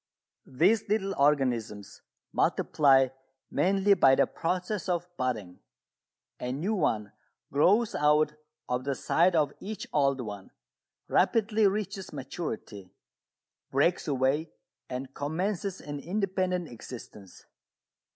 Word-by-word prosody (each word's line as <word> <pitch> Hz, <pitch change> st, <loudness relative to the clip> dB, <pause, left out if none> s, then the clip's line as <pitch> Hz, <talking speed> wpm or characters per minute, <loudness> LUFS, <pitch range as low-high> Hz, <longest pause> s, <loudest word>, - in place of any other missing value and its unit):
These 195 Hz, -, +2 dB
little 195 Hz, -2 st, 0 dB
organisms 125 Hz, -8 st, 0 dB, 0.3 s
multiply 135 Hz, -4 st, +3 dB, 0.4 s
mainly 195 Hz, +2 st, +3 dB
by 135 Hz, -8 st, +5 dB
the -, -, +4 dB
process 180 Hz, +2 st, -3 dB
of 175 Hz, 0 st, -1 dB
"budding." 110 Hz, -, -3 dB, 0.8 s
A 125 Hz, -, -3 dB
new 165 Hz, +11 st, -1 dB
one 110 Hz, -, 0 dB, 0.4 s
grows 205 Hz, +10 st, +3 dB
out 150 Hz, +1 st, +3 dB, 0.3 s
of 125 Hz, 0 st, -1 dB
the 140 Hz, 0 st, -1 dB
side 175 Hz, +6 st, +2 dB
of 150 Hz, -3 st, +2 dB
each 210 Hz, 0 st, -6 dB
old 140 Hz, -2 st, +2 dB
one, 100 Hz, -4 st, -7 dB, 0.6 s
rapidly 220 Hz, -1 st, +3 dB
reaches 195 Hz, -1 st, -3 dB
maturity, 130 Hz, -, -6 dB, 0.8 s
breaks 155 Hz, +7 st, +1 dB
away 140 Hz, +3 st, +1 dB, 0.4 s
and 130 Hz, +1 st, -5 dB
commences 185 Hz, +6 st, -2 dB
an 145 Hz, -1 st, -6 dB
independent 185 Hz, 0 st, -1 dB
existence. 110 Hz, -5 st, -11 dB
150 Hz, 105 wpm, -28 LUFS, 130-190 Hz, 0.8 s, by